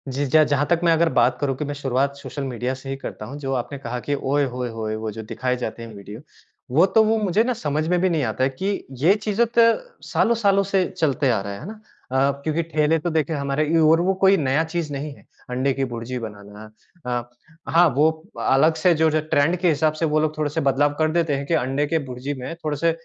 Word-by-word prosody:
जी, 145 Hz, +1 st, 0 dB
ज 155 Hz, +4 st, +5 dB
जहाँ 145 Hz, 0 st, +2 dB
तक, 170 Hz, +2 st, +1 dB
मैं 170 Hz, -, +4 dB
अगर 165 Hz, +1 st, +3 dB
बात 125 Hz, 0 st, +3 dB
करूँ 135 Hz, -2 st, 0 dB
कि 150 Hz, -, -3 dB
मैं 145 Hz, -, -4 dB
शुरुआत 140 Hz, 0 st, -1 dB
सोशल 140 Hz, 0 st, -7 dB
मीडिया 125 Hz, -1 st, -3 dB
से 135 Hz, +1 st, -9 dB
ही 135 Hz, -, -2 dB
करता 110 Hz, -, -7 dB
हूँ, 135 Hz, +6 st, -8 dB
जो 135 Hz, -2 st, -3 dB
आपने 130 Hz, +3 st, -3 dB
कहा 125 Hz, -2 st, -5 dB
कि, 145 Hz, +4 st, -2 dB
"ओये! 140 Hz, +1 st, 0 dB
होये! 125 Hz, -1 st, -3 dB
होये! 110 Hz, -1 st, -4 dB
वो 110 Hz, 0 st, -4 dB
जो 110 Hz, +2 st, -7 dB
दिखाए 125 Hz, 0 st, -1 dB
जाते 115 Hz, +1 st, -5 dB
हैं, 115 Hz, -1 st, -9 dB
वीडियो।" 100 Hz, +2 st, -10 dB, 0.6 s
वो 165 Hz, +5 st, +6 dB
तो, 220 Hz, +3 st, +4 dB
वो 220 Hz, +1 st, +2 dB
मुझे 210 Hz, 0 st, +2 dB
ना 250 Hz, +1 st, 0 dB
समझ 155 Hz, -5 st, -2 dB
में 180 Hz, +1 st, +2 dB
भी 185 Hz, -, +3 dB
नहीं 160 Hz, -4 st, 0 dB
आता 115 Hz, +2 st, -1 dB
है 130 Hz, -, +3 dB
कि 135 Hz, +9 st, -5 dB, 0.3 s
ये 170 Hz, +6 st, +6 dB
चीज़ें 215 Hz, +2 st, +2 dB
तो -, -, +8 dB, 0.5 s
सालों-सालों 205 Hz, -4 st, +2 dB
से 195 Hz, -2 st, +2 dB
चलते 145 Hz, -3 st, 0 dB
आ 115 Hz, -4 st, +2 dB
रहे 100 Hz, 0 st, -5 dB
हैं, 100 Hz, -, -8 dB
है 155 Hz, -, -8 dB
ना? 215 Hz, +1 st, -9 dB, 0.3 s
अ, 135 Hz, +2 st, +3 dB
क्योंकि 160 Hz, +2 st, 0 dB
ठेले 155 Hz, 0 st, +1 dB
तो, 175 Hz, -, -2 dB
देखिए, 160 Hz, 0 st, 0 dB
हमारे 140 Hz, +1 st, -1 dB
यू 160 Hz, -2 st, +5 dB
और 165 Hz, +1 st, +4 dB
वो 190 Hz, +2 st, +2 dB
कोई 195 Hz, +1 st, +6 dB
नया 145 Hz, 0 st, +1 dB
चीज़ 165 Hz, -2 st, -4 dB
नहीं 145 Hz, +1 st, -5 dB
है, -, -, -20 dB, 0.2 s
अंडे 130 Hz, +2 st, 0 dB
की 135 Hz, 0 st, -1 dB
भुर्जी 120 Hz, +2 st, -4 dB
बनाना। 105 Hz, 0 st, -12 dB, 0.4 s
अ, 120 Hz, -1 st, -3 dB, 0.5 s
हाँ, 175 Hz, +1 st, +7 dB
वो 155 Hz, +2 st, +5 dB, 0.3 s
अलग 155 Hz, +5 st, +3 dB
से 180 Hz, -2 st, +6 dB
जो-जो 155 Hz, -1 st, +3 dB
ट्रेंड 145 Hz, +5 st, +3 dB
के 180 Hz, +1 st, 0 dB
हिसाब 155 Hz, 0 st, +2 dB
से -, -, +3 dB
वो 155 Hz, -, +4 dB
लोग 155 Hz, 0 st, -1 dB
थोड़े-से 155 Hz, +1 st, -1 dB
बदलाव 145 Hz, +2 st, +2 dB
कर 155 Hz, 0 st, +2 dB
देते 165 Hz, -3 st, +1 dB
हैं 140 Hz, +1 st, -4 dB
कि 170 Hz, -, 0 dB
अंडे 135 Hz, +3 st, 0 dB
की 165 Hz, +2 st, +1 dB
भुर्जी 130 Hz, +3 st, -5 dB
में 165 Hz, -, -5 dB
थोड़े 150 Hz, -2 st, -2 dB
से 165 Hz, +3 st, +2 dB
145 Hz, 245 wpm, -22 LUFS, 130-165 Hz, 0.6 s, तो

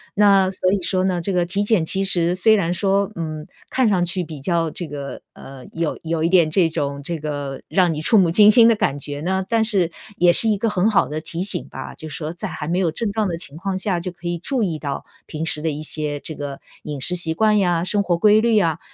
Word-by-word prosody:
那 195 Hz, -2 st, +4 dB
所 185 Hz, -1 st, 0 dB
以 200 Hz, -, -1 dB
说 185 Hz, +1 st, 0 dB
呢， 180 Hz, -2 st, -1 dB
这 195 Hz, +4 st, -3 dB
个 180 Hz, -1 st, +1 dB
体 195 Hz, +4 st, -1 dB
检 205 Hz, -6 st, +1 dB
其 190 Hz, +4 st, 0 dB
实 175 Hz, -2 st, +5 dB
虽 220 Hz, +4 st, +4 dB
然 175 Hz, -3 st, -1 dB
说， 195 Hz, +1 st, 0 dB
嗯， 155 Hz, -2 st, -6 dB, 0.2 s
看 260 Hz, -3 st, +1 dB
上 185 Hz, -4 st, +2 dB
去 175 Hz, +1 st, -2 dB
比 155 Hz, -4 st, -8 dB
较 165 Hz, +2 st, 0 dB
这 175 Hz, -, -5 dB
个， 140 Hz, -2 st, -7 dB
呃， 135 Hz, -1 st, -12 dB
有 165 Hz, -2 st, -3 dB
有 165 Hz, 0 st, -1 dB
一 -, -, +3 dB
点 170 Hz, -3 st, +3 dB
这 175 Hz, +1 st, +3 dB
种 140 Hz, -3 st, -3 dB
这 165 Hz, +3 st, -4 dB
个 145 Hz, -2 st, -5 dB
让 180 Hz, -4 st, +2 dB
你 150 Hz, -, -5 dB
触 220 Hz, +8 st, +3 dB
目 185 Hz, -4 st, +4 dB
惊 210 Hz, +5 st, +6 dB
心 230 Hz, +1 st, +7 dB
的 230 Hz, -, +4 dB
感 205 Hz, -10 st, -1 dB
觉 145 Hz, 0 st, -5 dB
呢， 190 Hz, +3 st, -1 dB
但 225 Hz, +1 st, +1 dB
是 195 Hz, -7 st, 0 dB, 0.3 s
也 175 Hz, 0 st, +4 dB
是 225 Hz, +5 st, +4 dB
一 210 Hz, -, +1 dB
个 225 Hz, +3 st, -1 dB
很 205 Hz, 0 st, +1 dB
好 210 Hz, -, +2 dB
的 155 Hz, +1 st, -5 dB
提 165 Hz, +2 st, -6 dB
醒 185 Hz, -2 st, -1 dB
吧， -, -, -8 dB
就 160 Hz, -, -9 dB
是 150 Hz, -, -7 dB
说 155 Hz, -1 st, -5 dB
在 175 Hz, -, -6 dB
还 150 Hz, -, -6 dB
没 175 Hz, +3 st, 0 dB
有 175 Hz, -4 st, +1 dB
症 220 Hz, +7 st, -3 dB
状 215 Hz, -2 st, 0 dB
的 170 Hz, -, -3 dB
情 155 Hz, -4 st, -8 dB
况 190 Hz, +3 st, -3 dB
下 190 Hz, -3 st, -1 dB
就 180 Hz, -, -5 dB
可 175 Hz, 0 st, -9 dB
以 175 Hz, 0 st, -2 dB
注 255 Hz, +9 st, -3 dB
意 175 Hz, -7 st, -1 dB
到 145 Hz, -2 st, -5 dB, 0.2 s
平 160 Hz, 0 st, -5 dB
时 155 Hz, -2 st, +3 dB
的 160 Hz, -, -1 dB
一 150 Hz, 0 st, -5 dB
些 150 Hz, -1 st, +1 dB
这 155 Hz, -, -9 dB
个 140 Hz, -2 st, -6 dB, 0.2 s
饮 145 Hz, -2 st, -6 dB
食 180 Hz, +7 st, +2 dB
习 170 Hz, -2 st, +1 dB
惯 215 Hz, +5 st, +2 dB
呀、 175 Hz, -3 st, +1 dB
生 205 Hz, +2 st, 0 dB
活 175 Hz, -3 st, 0 dB
规 210 Hz, +4 st, +4 dB
律 225 Hz, -2 st, +3 dB
啊， 165 Hz, -5 st, 0 dB
175 Hz, 280 characters per minute, -20 LUFS, 155-195 Hz, 0.3 s, 心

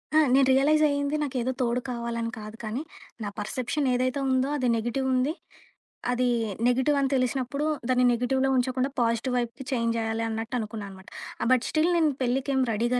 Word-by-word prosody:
ఆ! -, -, +6 dB, 0.2 s
నేను 270 Hz, 0 st, +5 dB
రియలైజ్ 295 Hz, +4 st, +4 dB
అయ్యింది 285 Hz, +1 st, 0 dB
నాకేదో 260 Hz, -3 st, -1 dB
తోడు 245 Hz, 0 st, +1 dB
కావాలని 235 Hz, -1 st, -3 dB
కాదు 215 Hz, +1 st, -9 dB
కానీ, 225 Hz, +6 st, -3 dB, 0.4 s
నా 205 Hz, -, -2 dB
పర్సెప్షన్ 255 Hz, +6 st, -2 dB
ఏదైతే 255 Hz, +2 st, 0 dB
ఉందో 260 Hz, +1 st, +2 dB
అది 255 Hz, -3 st, 0 dB
నెగెటివ్ 240 Hz, +4 st, -1 dB
ఉంది. 260 Hz, +4 st, +1 dB, 0.8 s
అది 250 Hz, 0 st, +1 dB, 0.4 s
నెగటివ్ 260 Hz, +4 st, +2 dB
అని 275 Hz, -1 st, +1 dB
తెలిసినప్పుడు 260 Hz, +2 st, -1 dB, 0.2 s
దాన్ని 250 Hz, 0 st, +3 dB
నెగెటివ్‌లో 260 Hz, +3 st, +1 dB
ఉంచకుండా, 255 Hz, +1 st, 0 dB
పాజిటివ్ 230 Hz, +2 st, 0 dB
వైపుకి 240 Hz, +2 st, -3 dB
చేంజ్ 230 Hz, -2 st, 0 dB
జేయాలి 225 Hz, 0 st, -1 dB
అన్నట్టనుకున్నాననమాట. 220 Hz, -4 st, -5 dB, 0.3 s
ఆహ్, -, -, 0 dB
బట్ 255 Hz, -2 st, +4 dB
స్టిల్ 315 Hz, +2 st, +2 dB
నేను 315 Hz, -3 st, +3 dB
పెళ్ళికేం 265 Hz, +2 st, 0 dB
రెడీగా 240 Hz, +3 st, +1 dB
250 Hz, 155 wpm, -26 LUFS, 230-270 Hz, 0.8 s, ఆ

